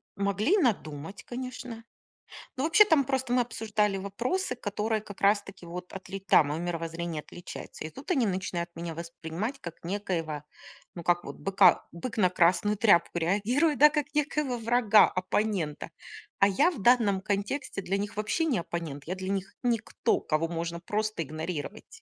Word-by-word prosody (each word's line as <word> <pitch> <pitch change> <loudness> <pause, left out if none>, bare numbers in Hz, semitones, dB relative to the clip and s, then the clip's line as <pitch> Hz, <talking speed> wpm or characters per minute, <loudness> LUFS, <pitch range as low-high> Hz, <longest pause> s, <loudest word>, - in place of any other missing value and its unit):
Могли 200 - +2
надумать, 190 - -1
конечно. 250 -2 -7 0.7
Но 260 - -2
вообще, 330 +7 +6
там 315 -8 +4
просто 260 -2 -1
мы 250 - +4
обсуждали 215 -4 0
вопросы, 245 - -2
которые 215 -1 -2
как 205 -2 -11
раз-таки 200 -2 +1
вот 180 +1 -7
отли 195 0 -7
там 185 -6 +4
моё 155 +3 -2
мировоззрение 165 -2 -3
отличается. 175 - -9
И 155 - -5
тут 270 - -7
они 265 -9 +3
начинают 180 -2 -2
меня 170 -1 -5
воспринимать 170 - -5
как 170 -1 -9
некоего, 165 -5 -3 0.5
ну, 170 - -7
как 175 +1 +2
вот - - -8
быка 195 -2 +4
бык 205 +7 -6
на 185 -4 +4
красную 185 +4 +3
тряпку 195 -5 +4
реагирует, 230 - +1
да. 300 - +9
Как 295 -1 -2
некоего 295 -3 0
врага, 230 -2 +5
оппонента. 185 -5 -1 0.5
А 195 - +6
я 200 - +3
в 295 - -8
данном 215 -5 +4
контексте 205 +3 -2
для 195 +1 -1
них 205 +2 -4
вообще 215 +10 0
не 265 - +1
оппонент. 165 -5 -5
Я 180 - -2
для 185 0 -5
них 195 0 -3
никто, 235 -3 0
кого 155 +1 0
можно 170 0 -4
просто 215 +1 -2
игнорировать. 155 +5 -5
200 Hz, 160 wpm, -28 LUFS, 170-235 Hz, 0.7 s, да